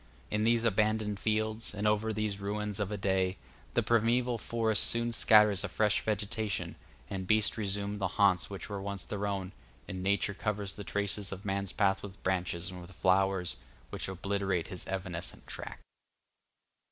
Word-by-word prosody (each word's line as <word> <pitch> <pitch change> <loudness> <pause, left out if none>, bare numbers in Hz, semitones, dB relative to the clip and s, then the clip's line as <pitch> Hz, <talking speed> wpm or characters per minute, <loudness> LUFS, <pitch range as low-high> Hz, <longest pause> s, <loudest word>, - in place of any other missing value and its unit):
In 105 +1 +1
these 115 0 +3
abandoned 105 -1 +1
fields, 110 0 0
and 105 +1 -2
over 105 +1 +2
these 105 -2 -2
ruins 105 0 -2
of 105 -1 -1
a 105 - -2
day, 95 -1 +1 0.4
the - - +3
primeval 120 +1 +2
forest 110 -2 +2
soon 115 0 +2
scatters 105 -3 +6
a 100 - -2
fresh 105 +3 +2
vegetation, 110 0 -2 0.3
the 95 - -4
beasts 110 +3 +2
resume 100 -1 -2
the 95 - +1
haunts 100 -3 +4
which 100 -1 -6
were 100 -2 -4
once 100 -1 -4
their 105 0 -2
own, 95 -2 -3 0.4
and 95 - -5
Nature 100 +1 +1
covers 100 -1 -2
the 105 - -6
traces 100 0 -1
of 95 +2 -7
man's 100 -1 -1
path 95 -1 +2
with 100 -1 -10
branches 90 -2 -1
and 90 -1 -8
with 90 - -11
flowers, 95 -4 +1 0.3
which - - -3
obliterate 95 -1 -1
his 90 - -4
evanescent 95 -2 -4
track. - - -7
100 Hz, 165 wpm, -31 LUFS, 95-105 Hz, 0.4 s, scatters